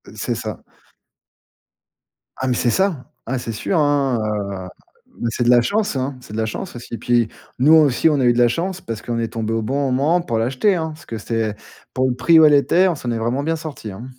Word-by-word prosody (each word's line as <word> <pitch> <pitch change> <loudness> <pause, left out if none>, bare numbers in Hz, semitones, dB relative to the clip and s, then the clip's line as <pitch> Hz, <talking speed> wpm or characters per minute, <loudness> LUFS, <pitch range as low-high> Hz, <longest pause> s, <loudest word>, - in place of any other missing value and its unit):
C'est - - -2
ça. - - -6 1.8
Ah, 130 - -2
mais 125 - +2
c'est 120 - +1
ça. 175 -3 0 0.2
Ah, 130 +2 -2
c'est 115 - -5
sûr, 115 - -2
hein. 145 -5 +2
Heu, 100 -3 -3 0.6
c'est 120 - -1
de 120 - +2
la 120 -1 +6
chance, 210 - 0
hein, 130 +1 -2
c'est 125 - -13
de 110 - -4
la 110 - 0
chance 120 - -6
aussi. 120 0 -10
Et 115 - -2
puis 120 -2 +1 0.3
nous 150 +5 +5
aussi, 155 0 +5
on 145 - +1
a - - +2
eu 120 - +5
de 120 - -3
la 120 - +6
chance 180 +9 -2
parce 115 -2 -6
qu'on 120 -1 -3
est 115 - -1
tombé 110 0 -3
au 115 - 0
bon 135 +4 -1
moment 150 +7 +2
pour 115 -9 -2
l'acheter, 130 - +1
hein, 160 -2 -2
parce 155 - -15
que 115 - -6
c'est 110 -1 -2 0.4
pour 130 0 +1
le 125 - -1
prix 160 +6 +5
où 160 - +8
elle 150 - +6
était, 170 +6 +4
on 175 - 0
s'en 125 -4 -4
est 115 - -1
vraiment 120 +5 -1
bien 165 +2 0
sorti, 150 -9 -7
hein. 105 +6 -9
125 Hz, 240 wpm, -20 LUFS, 115-155 Hz, 1.8 s, où